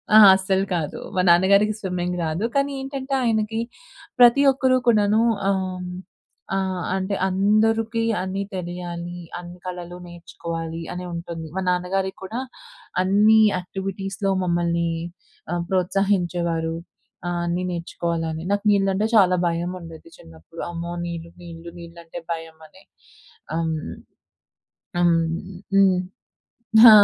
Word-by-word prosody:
ఆ! - - +11 0.2
అస్సలు 190 0 +1
కాదు. 160 -4 -3 0.2
మా 185 - +3
నాన్నగారికి 200 +5 +5
స్విమ్మింగ్ 180 -2 -2
రాదు. 165 +7 -1
కానీ 280 0 +2
ఏంటంటే 270 0 -5
ఆయనకి 225 -1 0 0.6
ప్రతి 245 +3 +7
ఒక్కరూ 260 -1 +2
కూడాను 210 -2 +4 0.3
ఆహ్, 185 -2 -1 0.7
ఆహ్, 190 -2 -1
అంటే, 190 +1 -1
"అందరికి 220 +4 +2 0.2
అన్నీ 190 +1 -2
తెలియాలి. 175 -1 -5 0.2
అన్ని 175 0 -10
కళలు 180 -1 -6
నేర్చుకోవాలి" 165 -1 -6
అని 180 0 -5
ఉంటుంది. 170 -1 -6
మా 190 - -1
నాన్నగారికి 190 +2 -1
కూడా 220 +6 -4 0.6
అన్ని 210 +3 +5 0.2
యాక్టివిటీస్‌లో 195 +2 -3
మమ్మల్ని 170 -1 +1 0.6
ఆహ్, 175 0 -1
ప్రోత్సహించేవారు. 175 -3 0 0.5
ఆహ్, 175 0 -1
అన్నీ 175 +1 -1
నేర్చుకోవాలని. 165 -1 -3
నాకు 205 0 +1
నీళ్ళంటే 195 +1 +2
చాలా 185 -4 +6
భయం 170 +1 -1
ఉండేది 165 0 -11
చిన్నప్పుడు. 80 - -12
"అమ్మో! 170 0 -5
నీళ్ళు 170 -1 -6
నీళ్ళు 170 0 -9
నీళ్లంటే 170 0 -9
భయం" 165 -1 -8
అని. - - -20 0.7
హ్మ్, 160 -1 -1 1.2
హ్మ్, 170 -1 +4 0.6
హ్మ్. 190 -2 +5 0.8
హా! 235 - +12
180 Hz, 115 wpm, -23 LUFS, 170-195 Hz, 1.2 s, హా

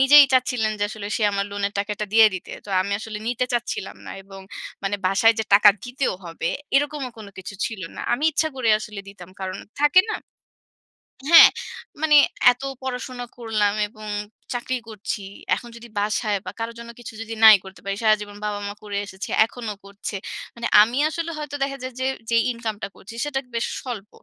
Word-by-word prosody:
নিজেই 285 +2 +9
চাচ্ছিলেন 250 -4 +2
যে - - -2
আসলে 210 -1 -7
সে 220 - -2
আমার 200 0 0
লোনের 200 0 -1
টাকাটা 210 +1 -2
দিয়ে 220 0 +8
দিতে। 185 - -7
তো - - -14
আমি 200 +1 -3
আসলে 215 -1 -6
নিতে 250 +1 0
চাচ্ছিলাম 240 -5 -2
না - - -6
এবং 195 0 -12 0.4
মানে 200 +1 -1
বাসায় 205 +4 +5
যে 220 - 0
টাকা 205 0 +8
দিতেও 245 -2 -1
হবে, 165 0 -3 0.3
এরকমও 285 -2 0
কোনো 205 -2 -10
কিছু 190 +2 -7
ছিলো 195 -7 -6
না। - - -5
আমি 285 +6 0
ইচ্ছা 315 +2 +1
করে 240 -3 0
আসলে 210 -1 -7
দিতাম 185 -3 -12
কারণ 185 0 -4 0.2
থাকে 295 +5 +7
না? - - -1 1.2
হ্যাঁ। 330 - +11 0.5
মানে 305 -1 +4 0.4
এতো 250 +2 -6 0.2
পড়াশোনা 250 -1 -4
করলাম 215 -3 +1
এবং 215 0 -12 0.5
চাকরি 250 +1 -2
করছি। 210 0 -4 0.3
এখন 240 - -8
যদি 235 +1 -11
বাসায় 210 0 0
বা - - -4
কারো 230 +1 -3
জন্য 235 0 -9
কিছু 235 - -9
যদি 225 0 -6
নাই 220 -1 +11
করতে 190 0 -12
পারি, 195 0 -1
সারাজীবন 210 -1 +1
বাবা-মা 205 -1 -3
করে 205 -1 -4
এসেছে, 190 0 -7 0.2
এখনো 230 -2 -6
করছে। 200 +1 -6 0.4
মানে 235 0 -2
আমি 235 +5 +2
আসলে 335 +1 -3
হয়তো 295 -1 -5
দেখা 275 0 -2
যায় 255 -1 -5
যে 260 - -1 0.2
যেই 230 0 +4
ইনকামটা 220 -4 -4
করছি 210 +4 -12
সেটা 280 -2 -1 0.2
বেশ 230 - 0 0.2
স্বল্প, 220 -5 -6
220 Hz, 185 wpm, -23 LUFS, 205-250 Hz, 1.2 s, হ্যাঁ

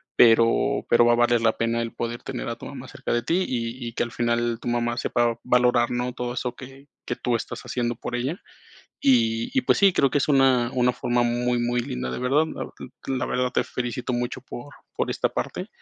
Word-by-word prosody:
pero 115 0 +4
pero 120 0 +5
va 120 - +5
a - - +4
valer 120 -1 +3
la 115 -1 +2
pena 115 0 0
el 115 - -5
poder 120 +1 -4
tener 130 - -5
a 115 - -3
tu - - -10
mamá 130 -2 -8
cerca - - -4
de 120 - +1
ti, 180 +7 +1
y 120 0 -3
y 115 - -6
que - - -2
al 120 - -5
final 120 0 0
tu - - -6
mamá 120 0 0
sepa 120 -1 0
valorar, 125 -1 +3
¿no?, 125 +1 -1
todo 120 0 -4
eso 125 -1 -3
que 135 +2 -12 0.2
que - - -1
tú 120 -2 -1
estás 115 +1 -5
haciendo 120 -1 -2
por 120 - -5
ella. 130 +9 -3 0.6
Y 115 -3 +3
y, 265 - +4
pues, - - +3
sí, 200 -1 +5
creo 140 - +3
que - - +2
es 140 - -1
una 130 -4 +4
una 125 0 +3
forma 120 0 0
muy, 120 +1 0
muy 120 +1 0
linda, 65 - -4
de - - -4
verdad. 135 +5 +2 0.6
L 135 - -1
la - - -1
verdad 125 0 0
te - - +1
felicito 125 0 -3
mucho 120 +2 -2
por 130 +2 -9 0.2
por - - -1
esta - - 0
parte, - - -4
120 Hz, 230 wpm, -24 LUFS, 120-125 Hz, 0.6 s, pero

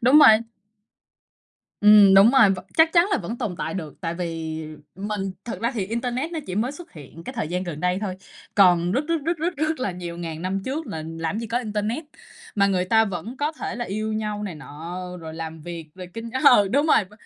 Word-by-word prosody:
đúng 255 +6 +6
rồi. 220 -7 +8 1.4
Ừm, 210 -2 +8
đúng 195 +4 +8
rồi, 245 -7 +6
vẫn 190 -1 -3
chắc 320 0 +5
chắn 345 +1 +5
là 400 - +2
vẫn 235 +2 -5
tồn 180 - -3
tại - - -3
được, 160 -6 -7
tại 170 -2 -3
vì 165 -2 -4 0.3
mình 195 0 -3
thực 235 - -6
ra 235 +2 +1
thì 200 -5 -2
internet 245 - -2
nó 325 - -2
chỉ 185 - -4
mới 235 +6 0
xuất 335 +4 -12
hiện 155 +2 -12
cái 260 - -6
thời 225 -11 -3
gian 180 +1 -2
gần 170 -4 -6
đây 180 +1 +1
thôi, 190 -3 -3 0.4
còn 180 -3 +5
rất, 275 +6 0
rất, 335 - +2
rất, 335 +2 0
rất, 340 +2 -2
rất 310 0 -1
là 205 - 0
nhiều 175 -1 -7
ngàn 165 -1 -5
năm 190 +1 -2
trước 295 +4 -3
là 160 - -5
làm 165 +4 -3
gì 230 - -4
có 230 +3 0
internet, 220 +5 -3 0.5
mà 200 -1 +4
người 185 -2 +1
ta 220 +3 +4
vẫn 195 +5 -5
có 295 +3 -1
thể 310 - -5
là 240 - -3
yêu 215 +2 -3
nhau 210 -1 -3
này 190 -5 -4
nọ 160 +4 -8 0.2
rồi 160 -1 -8
làm 160 0 -6
việc 165 -1 -8
rồi 185 -1 -8
kinh 230 0 -6
ừ, 225 -8 +7
đúng 285 +7 +2
rồi. 220 - +4
V 195 - -22
205 Hz, 235 wpm, -24 LUFS, 175-240 Hz, 1.4 s, rồi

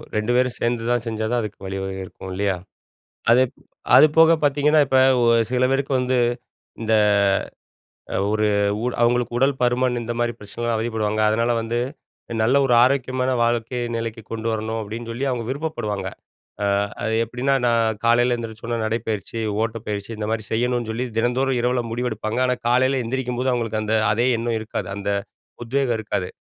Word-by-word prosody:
2 105 +2 0
பேரும் 125 -1 +2
சேர்ந்துதான் 120 0 0
செஞ்சாதான் 110 +2 -1
அதுக்கு 105 -2 -6
வழிவகை 95 0 -4
இருக்கும் 95 +1 -10
இல்லையா? 100 0 0 0.8
அதுப் 125 +2 +4 0.4
அது - - +9
போக 165 0 +7
பார்த்தீங்கன்னா, 145 +2 +3
இப்ப 130 - +1 0.3
வ - - +3 0.3
சில 125 0 +2
பேருக்கு 135 +1 0
வந்து 125 0 +1 0.6
இந்த 110 - 0 1.2
அ - - +1
ஒரு 110 0 +2 0.4
உட 125 - 0
அவங்களுக்கு 120 0 +2
உடல் 135 +2 +3
பருமன், 125 0 +2
இந்த 120 +1 -3
மாரி 120 0 0
பிரச்சனைலாம் 115 +3 -3
அவதிப்படுவாங்க. 110 -1 -1
அதனால 115 +2 +1
வந்து, 115 +1 -2 0.6
நல்ல 115 +5 +3
ஒரு 125 - +2
ஆரோக்கியமான 130 -1 +1
வாழ்க்கைய 120 +1 -1
நிலைக்கு 115 0 -4
கொண்டு 115 0 -3
வரணும். 110 +1 -2
அப்படின்னு 115 +3 -6
சொல்லி 130 +4 -3
அவங்க 125 -2 -2
விருப்பப்படுவாங்க. 110 -10 -3 0.6
அ, - - +2 0.4
அது 110 - 0
எப்டின்னா? 125 +4 -1
நான் 115 -2 +2
காலைல 120 +1 +3
எந்திரிச்சோன 115 0 -5
நடைப்பயிற்சி, 110 0 -3 0.2
ஓட்டப்பயிற்சி, 110 -2 -4
இந்த 105 0 -4
மாரி 110 -1 -2
செய்யணும்னு 120 0 0
சொல்லி 120 +3 -2
தினந்தோறும் 125 +2 +1
இரவுல 125 0 +1
முடிவெடுப்பாங்க. 115 -1 -2
ஆனா, 125 - +1
காலைல 130 +2 +3
எந்திரிக்கும்போது 125 +1 -1
அவங்களுக்கு 115 -3 -1
அந்த, 110 +1 0 0.2
அதே 120 +3 +1
எண்ணம் 115 0 -1
இருக்காது. 110 - -5
அந்த 100 0 -3 0.5
உத்வேகம் 125 -1 0
இருக்காது. 95 -4 -3
120 Hz, 150 wpm, -22 LUFS, 110-125 Hz, 1.2 s, அது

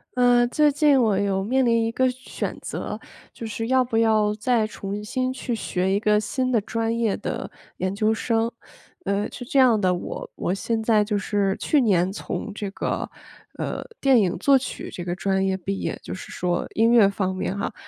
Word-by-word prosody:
呃， 245 -1 +5
最 300 +4 +3
近 285 -2 +4
我 215 -4 +2
有 195 -1 0
面 255 +5 +1
临 230 -1 +3
一 - - 0
个 260 0 +2
选 255 +1 -6
择， - - -5 0.3
就 230 - -7
是 225 +1 -4
要 260 +1 +4
不 245 -2 -2
要 215 -2 +3
再 220 0 +1
重 205 -1 -5
新 255 +5 -2
去 260 -2 -3
学 185 -3 -1
一 200 - 0
个 210 -1 +3
新 255 +4 -1
的 235 - +3
专 225 +2 -2
业 225 -4 +1
的 - - -4 0.3
研 185 +1 -2
究 215 +2 +2
生。 225 +1 0 0.5
呃， 200 +1 -1
是 245 - -8
这 275 - -2
样 250 -5 +6
的， 185 -2 +2
我 175 - -6
我 180 - -1
现 220 +3 -2
在 220 -1 +4
就 210 0 0
是 200 -1 0
去 300 - +3
年 190 -7 +2
从 210 +1 -5
这 205 -1 -4
个， - - -3 0.5
呃， - - -3 0.2
电 270 -3 +5
影 185 -4 +1
作 275 +9 +5
曲 260 - -6
这 175 - -6
个 175 0 -2
专 190 0 0
业 190 - +1
毕 195 +1 -3
业， - - -3
就 - - -6
是 185 - -8
说 175 -1 -2
音 225 +1 +4
乐 230 -4 +7
方 195 -1 -1
面 185 +1 -3
哈。 200 - -3
220 Hz, 220 characters per minute, -24 LUFS, 195-245 Hz, 0.5 s, 乐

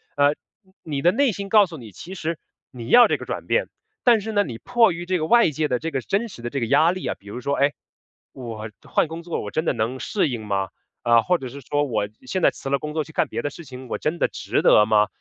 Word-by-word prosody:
呃， 145 +1 +3 0.5
你 145 -4 -3
的 175 +3 +5
内 270 +2 +2
心 200 0 -6
告 210 -1 +6
诉 165 -3 -9
你， 115 -6 -11
其 175 - -10
实 165 -3 -3 0.3
你 120 -5 -9
要 245 0 +8
这 - - 0
个 - - -9
转 - - -5
变。 - - +1 0.4
但 235 -2 +6
是 220 +2 -5
呢， 205 -1 +3
你 120 -7 -6
迫 235 - +3
于 170 +1 -5
这 185 0 0
个 155 - -1
外 235 -5 +5
界 155 0 -1
的 125 - 0
这 165 - -3
个 135 -4 -2
真 205 - -1
实 155 - -12
的 120 - -4
这 140 - -3
个 115 - 0
压 160 +9 +4
力 185 - -5
啊， - - -2
比 100 - -20
如 105 +5 -6
说， 140 +3 -1
哎， 140 +1 +3 0.6
我 115 -4 -7
换 - - 0
工 165 +2 -7
作 170 - -3
我 105 - -5
真 155 - -1
的 - - +1
能 120 +1 -2
适 195 +6 0
应 120 -5 -4
吗？ 100 -2 -1 0.3
啊， 115 -1 +5
或 180 +8 +2
者 130 - -7
是 140 +3 -9
说 145 +3 0
我 110 -6 -1 0.2
现 185 +6 -2
在 - - +5
辞 135 - -7
了 140 0 +1
工 150 0 -5
作 155 -2 -1
去 160 - -14
干 - - +1
别 - - -3
的 145 - -2
事 170 - -11
情， 130 -2 -10
我 - - -3
真 160 +3 -2
的 - - +3
值 - - -2
得 105 - +6
吗？ 105 -1 +3
145 Hz, 300 characters per minute, -23 LUFS, 120-175 Hz, 0.6 s, 要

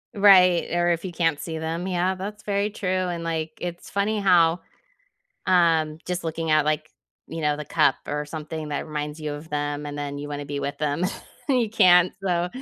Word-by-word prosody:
Right, 185 -4 +6
or 175 0 +2
if 170 -1 0
you 185 - -4
can't 165 -3 0
see 160 -1 -5
them. 165 +3 -3
Yeah, 180 0 +1
that's 205 +3 -7
very 200 0 0
true, 205 -2 -6
and, 180 -2 -1
like, 160 -1 -3
it's 175 -1 -6
funny 205 +2 0
how, 175 -3 +4 0.9
um, 165 -4 +3
just 180 -1 -3
looking 165 0 -3
at, 155 -1 +4
like, 155 +1 -1 0.4
you 165 0 -6
know, 150 -1 +1
the 150 - -6
cup 135 - +3
or 150 0 -2
something 155 0 -6
that 145 - -3
reminds 150 0 -4
you 150 -1 -4
of 150 +2 -9
them 145 0 -2
and 145 0 -6
then 145 0 -4
you 145 - -6
wanna 145 0 -5
be 140 0 -4
with 140 0 -3
them, 150 +3 -1 0.5
and 260 - +4
you 225 - -1
can't, 180 -4 +5
so, 175 -2 +1
165 Hz, 205 wpm, -24 LUFS, 150-180 Hz, 0.9 s, Right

